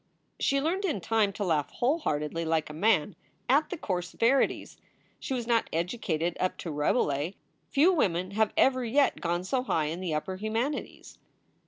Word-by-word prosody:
She 275 Hz, -, +2 dB
learned 340 Hz, +8 st, -1 dB
in 320 Hz, -, 0 dB
time 210 Hz, +3 st, +1 dB
to 205 Hz, -, -3 dB
laugh 155 Hz, -6 st, 0 dB
whole 275 Hz, +7 st, 0 dB
heartedly, 150 Hz, -, -2 dB
like 160 Hz, -2 st, 0 dB
a -, -, -9 dB
man, 185 Hz, 0 st, +2 dB, 0.3 s
at 285 Hz, +5 st, +3 dB
the 365 Hz, -, -4 dB
coarse 180 Hz, -, -3 dB
verities. 260 Hz, +4 st, +1 dB, 0.4 s
She 265 Hz, -, -3 dB
was 240 Hz, -2 st, -3 dB
not 230 Hz, -1 st, +1 dB
educated 170 Hz, -1 st, -1 dB
up 185 Hz, -, -1 dB
to 165 Hz, -, -5 dB
Rabe 150 Hz, 0 st, +2 dB
lais. 145 Hz, +5 st, -2 dB, 0.4 s
Few 315 Hz, +7 st, +4 dB
women 185 Hz, -, 0 dB
have 215 Hz, +1 st, +1 dB
ever 255 Hz, -1 st, +4 dB
yet 270 Hz, +5 st, +2 dB
gone 175 Hz, 0 st, -1 dB
so 250 Hz, +7 st, 0 dB
high 165 Hz, -11 st, 0 dB
in 170 Hz, -, -6 dB
the 175 Hz, -4 st, -2 dB
upper 185 Hz, +5 st, -3 dB
humanities. 225 Hz, +8 st, -4 dB
200 Hz, 180 wpm, -28 LUFS, 165-255 Hz, 0.4 s, Few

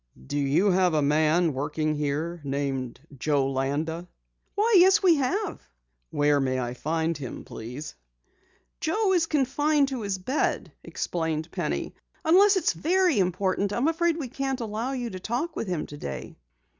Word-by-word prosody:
"Do 145 Hz, -, -2 dB
you 145 Hz, +9 st, +3 dB
have 180 Hz, -2 st, +3 dB
a 150 Hz, -, +3 dB
man 155 Hz, +3 st, +3 dB
working 150 Hz, +3 st, -1 dB
here 150 Hz, +3 st, -2 dB
named 135 Hz, -3 st, -3 dB, 0.2 s
Joe 140 Hz, -1 st, +1 dB
Landa?" 150 Hz, +6 st, -2 dB, 0.5 s
"Why, 430 Hz, +2 st, +3 dB
yes, 385 Hz, +3 st, +6 dB
we 345 Hz, -4 st, +6 dB
have." 365 Hz, +9 st, -1 dB, 0.5 s
"Where 145 Hz, 0 st, +2 dB
may 130 Hz, -1 st, 0 dB
I 120 Hz, -1 st, -3 dB
find 160 Hz, +5 st, -1 dB
him, 135 Hz, -4 st, -7 dB
please?" 125 Hz, +7 st, -7 dB, 0.9 s
"Joe 385 Hz, +4 st, +1 dB
is 335 Hz, -3 st, +2 dB
confined 290 Hz, 0 st, +2 dB
to 260 Hz, -3 st, -4 dB
his 200 Hz, -2 st, -2 dB
bed," 255 Hz, +11 st, -1 dB
explained 160 Hz, -1 st, -3 dB
Penny. -, -, -3 dB, 0.3 s
"Unless 385 Hz, +5 st, +6 dB
it 375 Hz, -, 0 dB
is -, -, +2 dB
very 355 Hz, -, +2 dB
important 190 Hz, +2 st, 0 dB
I -, -, -2 dB
am 255 Hz, +5 st, +2 dB
afraid 330 Hz, 0 st, +1 dB
we 290 Hz, -6 st, -4 dB
can't 270 Hz, +1 st, -3 dB
allow 230 Hz, +3 st, -3 dB
you 245 Hz, -3 st, -3 dB
to 185 Hz, -, -6 dB
talk 245 Hz, -, -3 dB
with 230 Hz, -, -3 dB
him 175 Hz, -4 st, -2 dB
today." 145 Hz, -, -7 dB
185 Hz, 160 wpm, -26 LUFS, -, 0.9 s, yes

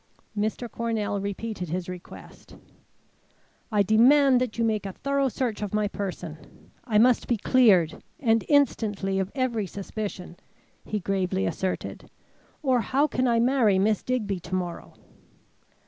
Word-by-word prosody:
Mr. 215 Hz, +3 st, -2 dB
Cornell 225 Hz, -3 st, -2 dB
repeated 200 Hz, -2 st, -4 dB
his 175 Hz, +2 st, -3 dB
request. 180 Hz, -1 st, -11 dB, 1.2 s
"I 210 Hz, -2 st, +3 dB
demand 250 Hz, +5 st, +5 dB
that 250 Hz, -3 st, -2 dB
you 230 Hz, -, +1 dB
make 215 Hz, -3 st, 0 dB
a 190 Hz, -, -6 dB
thorough 275 Hz, +2 st, 0 dB
search 235 Hz, -2 st, -3 dB
of 210 Hz, 0 st, -3 dB
my 210 Hz, -1 st, +1 dB
person. 180 Hz, -6 st, -7 dB
I 220 Hz, -4 st, +1 dB
must 240 Hz, +2 st, +4 dB
be 240 Hz, -, +1 dB
cleared, 200 Hz, -9 st, +3 dB, 0.2 s
and 225 Hz, -4 st, +2 dB
instantly, 210 Hz, -9 st, +1 dB
of 190 Hz, 0 st, -2 dB
every 235 Hz, -6 st, -1 dB
suspicion," 195 Hz, -2 st, -6 dB, 0.5 s
he 210 Hz, -, -3 dB
gravely 190 Hz, 0 st, -1 dB
asserted, 185 Hz, -1 st, -4 dB, 0.5 s
"or 255 Hz, -4 st, +3 dB
how 270 Hz, +7 st, +2 dB
can 255 Hz, -4 st, 0 dB
I 235 Hz, -1 st, +3 dB
marry 235 Hz, -5 st, +3 dB
Miss 210 Hz, +2 st, +2 dB
Digby 210 Hz, -7 st, -2 dB
to 175 Hz, +2 st, -5 dB
morrow?" 175 Hz, -2 st, -5 dB
215 Hz, 140 wpm, -26 LUFS, 195-245 Hz, 1.2 s, demand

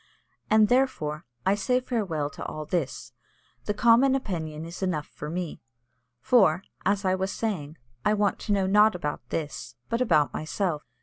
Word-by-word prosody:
And, 215 Hz, 0 st, +5 dB
therefore, 245 Hz, -, 0 dB, 0.2 s
I 190 Hz, -, +4 dB
say 250 Hz, +5 st, +1 dB
farewell 190 Hz, -, -2 dB
to -, -, -8 dB
all 155 Hz, 0 st, -5 dB
this; 165 Hz, -3 st, -3 dB, 0.5 s
the 210 Hz, -, 0 dB
common 240 Hz, +4 st, +5 dB
opinion 160 Hz, -, -4 dB
is 170 Hz, +3 st, -8 dB
enough 165 Hz, -6 st, -1 dB
for 150 Hz, -, -8 dB
me. 175 Hz, 0 st, -4 dB, 0.6 s
For, 190 Hz, -7 st, +4 dB, 0.2 s
as 200 Hz, 0 st, +1 dB
I 185 Hz, -, +3 dB
was 190 Hz, +1 st, -1 dB
saying, 170 Hz, -9 st, -3 dB, 0.3 s
I 210 Hz, -, +3 dB
want 205 Hz, -1 st, +1 dB
to 210 Hz, -, -4 dB
know 195 Hz, -2 st, +2 dB
not 210 Hz, +2 st, +5 dB
about 150 Hz, -4 st, -3 dB
this, 125 Hz, -7 st, -4 dB
but 230 Hz, +2 st, 0 dB
about 150 Hz, -, +3 dB
myself. 155 Hz, 0 st, -2 dB
190 Hz, 165 wpm, -27 LUFS, 155-215 Hz, 0.6 s, And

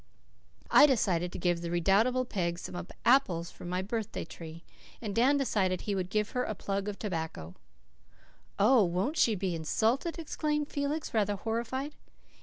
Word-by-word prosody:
I 295 Hz, -, +8 dB
decided 180 Hz, -, +1 dB
to -, -, -6 dB
give 175 Hz, -1 st, 0 dB
the 170 Hz, -, -4 dB
redoubtable 205 Hz, +9 st, +2 dB
Peg 170 Hz, -7 st, -2 dB
some 175 Hz, 0 st, -6 dB, 0.2 s
apples 190 Hz, -10 st, +3 dB
from 175 Hz, -, -9 dB
my 180 Hz, +1 st, -1 dB
birthday 220 Hz, -1 st, -3 dB
tree, 165 Hz, 0 st, -10 dB, 0.4 s
and 210 Hz, -4 st, -4 dB
Dan 255 Hz, +7 st, +4 dB
declared 190 Hz, -9 st, 0 dB
he 205 Hz, -, -2 dB
would 185 Hz, -2 st, -2 dB
give 210 Hz, +1 st, 0 dB
her 250 Hz, -, 0 dB
a 215 Hz, -, -3 dB
plug 195 Hz, +1 st, -3 dB
of 205 Hz, -1 st, -4 dB
tobacco. 160 Hz, -, -4 dB, 1.0 s
"Oh, 220 Hz, +3 st, +5 dB
won't 185 Hz, -, 0 dB
she 225 Hz, -8 st, +3 dB
be 185 Hz, -2 st, -2 dB
insulted?" 225 Hz, -, 0 dB
exclaimed 300 Hz, -2 st, -2 dB
Felix, 290 Hz, +2 st, -2 dB
rather 205 Hz, -2 st, +1 dB
horrified. 235 Hz, +7 st, -3 dB
205 Hz, 160 wpm, -30 LUFS, 175-250 Hz, 1.0 s, I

